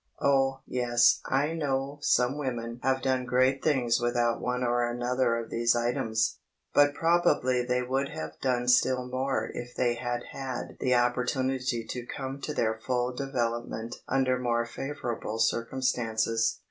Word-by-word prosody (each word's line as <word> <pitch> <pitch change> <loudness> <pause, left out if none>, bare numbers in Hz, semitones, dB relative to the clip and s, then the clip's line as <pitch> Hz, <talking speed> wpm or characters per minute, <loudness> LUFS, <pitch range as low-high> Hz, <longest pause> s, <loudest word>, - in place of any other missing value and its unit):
Oh, 135 -1 +2
yes, 120 -1 +3
I 145 +4 +1
know 140 -2 -2
some 125 -3 +3
few 145 - -5
women 120 -3 -4
have 130 0 +1
done 130 -1 +1
great 130 +2 +2
things 125 -6 +2
without 120 -1 +1
one 125 0 -1
or 120 0 +1
another 120 0 0
of 115 -1 -6
these 115 +1 +2
items—but 120 +4 0
probably 165 -7 +2
they 125 0 0
would 135 +2 -1
have 80 0 -7
done 125 -2 0
still 125 +1 +3
more 130 -2 -2
if 120 0 -7
they 120 -1 +2
had 120 0 -3
had 130 -2 -5
the 125 -1 +2
opportunity 125 0 0
to 125 -1 -5
come 135 0 -5
to 150 - -3
their 110 -1 0
full 125 0 0
development 120 -3 -3
under 130 -1 +1
more 120 -1 0
favourable 120 -3 -4
circumstances. 115 -1 0
125 Hz, 145 wpm, -28 LUFS, 120-135 Hz, -, yes